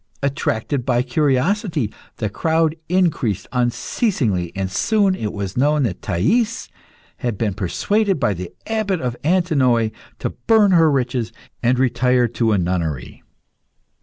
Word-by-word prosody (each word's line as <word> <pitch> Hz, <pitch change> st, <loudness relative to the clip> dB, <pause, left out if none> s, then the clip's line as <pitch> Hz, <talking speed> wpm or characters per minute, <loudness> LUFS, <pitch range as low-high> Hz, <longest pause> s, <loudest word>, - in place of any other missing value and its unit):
Attracted 140 Hz, -1 st, -1 dB
by 125 Hz, -1 st, +1 dB
curiosity, 145 Hz, -, 0 dB, 0.2 s
the 110 Hz, -, -1 dB
crowd 160 Hz, +8 st, +1 dB
increased 165 Hz, -, +1 dB
unceasingly, 120 Hz, -, 0 dB
and 95 Hz, -1 st, -2 dB
soon 200 Hz, -, +2 dB
it 110 Hz, -, -3 dB
was 100 Hz, -2 st, -5 dB
known 145 Hz, +3 st, +2 dB
that 100 Hz, -8 st, -2 dB
Thais 190 Hz, -, 0 dB, 0.5 s
had 120 Hz, -5 st, -3 dB
been 105 Hz, -2 st, -1 dB
persuaded 195 Hz, -, 0 dB
by 105 Hz, -, +2 dB
the 90 Hz, -1 st, -7 dB
Abbot 215 Hz, -5 st, -1 dB
of 125 Hz, -4 st, -2 dB
Antinoe 140 Hz, -10 st, +2 dB, 0.3 s
to -, -, -2 dB
burn 220 Hz, -3 st, +3 dB
her 165 Hz, -3 st, +5 dB
riches 125 Hz, -4 st, -1 dB, 0.3 s
and 125 Hz, +1 st, +2 dB
retire 125 Hz, -1 st, +2 dB
to 115 Hz, -1 st, 0 dB
a 105 Hz, -, +3 dB
nunnery. 85 Hz, -7 st, -2 dB
125 Hz, 135 wpm, -20 LUFS, 110-165 Hz, 0.5 s, her